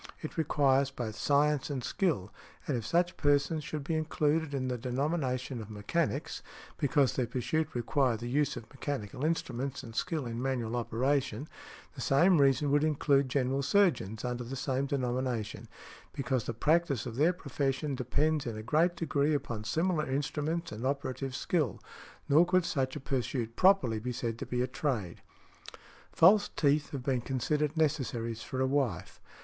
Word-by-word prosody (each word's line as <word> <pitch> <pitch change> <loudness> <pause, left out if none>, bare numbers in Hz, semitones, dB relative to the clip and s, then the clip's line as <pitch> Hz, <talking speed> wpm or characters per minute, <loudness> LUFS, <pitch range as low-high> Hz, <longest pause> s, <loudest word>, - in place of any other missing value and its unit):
It 155 - -5
requires 140 -4 +2
both 120 -6 -5
science 145 +3 +2
and 135 -4 -3
skill, 135 - -1 0.3
and 145 - -1
if 115 -3 -3
such 175 +1 +1
persons 145 +2 +2
should 150 0 -4
be 160 - -2
included 155 -1 0
in 135 -2 -2
the 125 - -1
denomination 130 0 -2
of 105 - -9
'mechanics,' 140 +8 -2 0.4
because 145 -2 +3
their 125 -2 0
pursuit 155 +6 -1
required 120 0 +1
the 120 - -5
use 145 +1 +1
of 115 -2 -8
mechanical 135 -3 -4
instruments 140 -4 -2
and 115 -2 -10
skill 155 +1 -1
in 115 0 -4
manual 125 -3 -1
operation, 130 +5 0 0.5
the - - -8
same 170 +4 +4
reason 140 +1 +3
would 145 +1 +3
include 140 -3 +2
general 135 +1 0
surgeons 140 - +2
under 125 0 -2
the 125 +3 -6
same 135 +1 -1
denomination, 125 -4 -2 0.5
because 130 -3 -1
the - - -2
|171| - - -29
practice 155 -6 +2
of 120 -3 -5
their 155 +7 +4
profession 140 -3 -2
depends 140 +3 0
in 115 -2 -4
a 110 - -6
great 160 +8 +2
degree 150 -2 +1
upon 120 -7 -3
similar 160 +7 0
instruments 150 +4 -2
and 110 +2 -6
operative 135 -1 -2
skill; 150 - 0 0.5
nor 155 +4 +6
could 180 0 +2
such 130 -4 -1
a - - -4
pursuit 125 -3 -2
properly 180 - +4
be 125 +3 -3
said 115 -2 -3
to - - -5
be 125 0 0
a - - -1
trade". 120 - -3 0.9
False 200 +5 +5
teeth 145 0 +2
have 135 -3 -5
been 130 -2 0
considered 150 +5 -1
necessaries 125 -7 0
for 130 - -5
a 130 - +3
wife. 130 - -1
135 Hz, 165 wpm, -31 LUFS, 125-150 Hz, 0.9 s, nor